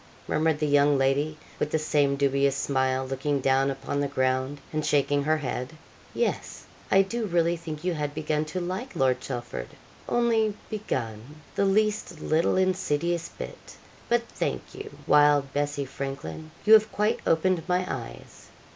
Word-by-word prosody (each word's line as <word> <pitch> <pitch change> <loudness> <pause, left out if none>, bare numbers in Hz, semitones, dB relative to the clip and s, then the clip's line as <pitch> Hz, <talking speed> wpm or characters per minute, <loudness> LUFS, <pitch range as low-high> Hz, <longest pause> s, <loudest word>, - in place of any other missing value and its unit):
murmured 160 -1 +1
the 150 - 0
young 145 0 +4
lady, 140 +3 +1 0.2
with - - 0
the 160 - +1
same 145 -2 +2
dubious 140 0 +2
smile, 130 -1 0
looking 135 +2 -1
down 135 +1 +2
upon 135 +1 -3
the 145 - +1
ground, 130 +1 0
and 155 0 -1
shaking 145 0 +2
her 155 +2 +2
head. 130 -1 -4 0.4
'Yes, 475 - -2 0.2
I 195 0 +6
do 225 +3 -3
really 170 -1 +2
think 160 -2 -7
you 180 -1 0
had 150 -2 -3
begun 155 0 -1
to 155 +4 -4
like 185 +7 -4
Lord 130 -4 +2
Chelford 120 - -5 0.4
only 225 -3 +2 0.2
begun, 130 - -4
the 200 - +1
least 210 -3 +1
little 160 +4 +1
insidious 175 -3 0
bit; - - -9 0.3
but 240 0 +3
thank - - -4
you, 410 +2 -7 0.2
wild 145 -2 +4
Bessie 145 -1 -1
Frankleyn, 140 +4 -6 0.2
you 215 - +7
have 215 0 +7
quite 210 +1 +1
opened 170 +2 +2
my 180 0 +1
eyes. - - -7
150 Hz, 155 wpm, -27 LUFS, 140-180 Hz, 0.4 s, you